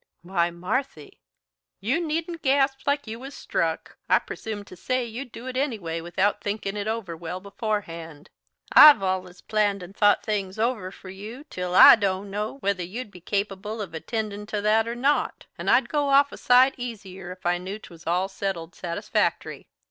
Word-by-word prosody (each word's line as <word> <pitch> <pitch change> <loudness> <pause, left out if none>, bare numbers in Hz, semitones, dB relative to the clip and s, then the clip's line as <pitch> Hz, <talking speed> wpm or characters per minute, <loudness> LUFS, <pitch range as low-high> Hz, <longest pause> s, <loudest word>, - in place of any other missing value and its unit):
"Why, 175 -1 +1
Marthy!" 185 +11 -4 0.6
"You 255 - 0
needn't 330 +1 -3
gasp 270 0 +1
like 285 0 +1
you 225 +1 -6
was 270 +2 -9
struck. 165 -1 -2
I - - +6
presume 215 -2 -6
to 190 - -13
say 255 +7 -1
you'd 240 +2 -7
do 235 - -10
it 260 -1 -5
anyway 210 - -2
without 190 +5 0
thinkin' 205 -1 -3
it 205 0 -3
over 220 -6 -3
well 170 +2 -6
beforehand. 185 -7 -5 0.4
I've 295 -9 +10
allus 185 -1 -2
planned 205 -3 0
and 185 +3 -11
thought 205 -1 +4
things 200 -2 -2
over 220 -4 0
for 190 0 -12
you 215 +8 -9
till 180 0 -3
I - - +11
don't 195 -1 -1
know 210 +5 -3
whether 200 -2 0
you'd 210 +6 -6
be 180 - -13
capable 200 +3 -3
of 195 -6 -5
attendin' 210 +4 -4
to 210 -1 -2
that 220 +2 +3
or 235 - -3
not. 275 +4 0
And - - -3
I'd - - +4
go 290 -2 0
off 280 +1 +5
a - - -9
sight 255 +2 +5
easier 195 -7 -7
if 185 0 -12
I 175 0 +2
knew 190 +3 -5
'twas 170 -6 -14
all 180 +3 +1
settled 190 -4 -4
satisfactory. 170 -1 -2
205 Hz, 180 wpm, -25 LUFS, 185-240 Hz, 0.6 s, I